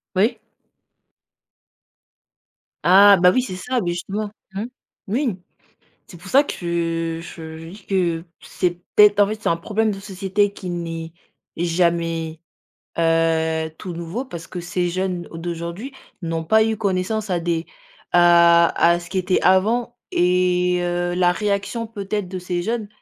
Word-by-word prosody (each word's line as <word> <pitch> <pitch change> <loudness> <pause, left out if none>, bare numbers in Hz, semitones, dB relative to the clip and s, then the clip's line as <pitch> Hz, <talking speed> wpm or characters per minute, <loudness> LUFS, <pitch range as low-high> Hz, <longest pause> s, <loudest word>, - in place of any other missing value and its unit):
Oui. 210 +6 +2 2.5
Ah, 200 +3 +8
bah, 180 0 +7
oui, 255 - +2
c'est 185 -7 -5
ça, 250 +7 -2
beh 175 -5 -1
justement. 200 +4 -4 0.2
Mmh. 200 +3 -3 0.4
Oui, 240 -1 0 0.7
c'est 175 - -13
pour 175 - -12
ça 275 +2 +5
que 165 - -2
je 160 -1 -9
je 165 0 -10
dis 200 +5 -12
que 175 -4 0 0.2
c'est 175 -1 -2
peut-être 210 -1 +6
en 205 - +6
fait 215 +1 -5
c'est - - 0
un 165 - +2
problème 215 +5 0
de 195 - -4
société 195 +1 -1
qui 185 -2 -7
n'est 165 -2 -5 0.4
jamais, 165 -1 0 0.6
heu, 160 -1 +1
tout 180 - -6
nouveau 170 +8 -4
parce 170 -9 -8
que 180 - -7
ces 175 0 -2
jeunes 185 0 -2
d'aujourd'hui 170 +8 -5 0.3
n'ont 165 -1 -2
pas 220 +7 +4
eu 220 0 -1
connaissance 200 +1 -1
à 175 - +1
des 170 -1 -1 0.5
à 170 -1 +6
à 170 0 +4
ce 170 0 -11
qui 190 - -3
était 185 0 +1
avant 230 +6 +2
et 180 0 +2
heu, 175 0 -1
la 180 -1 +3
réaction 205 +4 -2
peut-être 205 -2 -4
de 185 +1 -6
ces 180 -1 -3
jeunes 225 +2 -2
180 Hz, 150 wpm, -21 LUFS, 170-205 Hz, 2.5 s, Ah